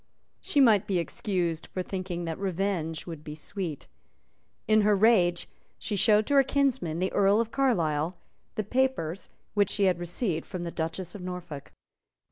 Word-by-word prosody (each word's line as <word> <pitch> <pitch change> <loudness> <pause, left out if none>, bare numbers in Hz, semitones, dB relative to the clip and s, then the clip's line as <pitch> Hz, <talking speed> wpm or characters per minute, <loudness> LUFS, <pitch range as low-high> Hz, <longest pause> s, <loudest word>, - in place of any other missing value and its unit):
She 290 - 0
might 220 -7 +5
be 190 - +1
excused 170 -2 -2
for 185 - -4
thinking 180 -2 -4
that 165 -1 -4
revenge 185 -4 -2
would 165 -4 -8
be 150 -1 -7
sweet. 165 -2 -5 0.8
In 215 0 +5
her 210 0 +4
rage 190 -5 +3 0.3
she 210 - -3
showed 210 +1 +4
to 285 - -1
her 275 -1 +6
kinsman 260 - 0
the 185 +2 -1
Earl 200 +1 +4
of 230 -1 -1
Carlisle 170 - +1 0.4
the 215 - -1
papers 210 -7 -1 0.2
which 205 -2 +2
she 200 - 0
had 185 -3 +3
received 175 -1 -2
from 180 -3 -5
the 170 - -4
Duchess 165 +2 -4
of 205 - -8
Norfolk. 180 -6 -7
185 Hz, 165 wpm, -28 LUFS, 170-210 Hz, 0.8 s, her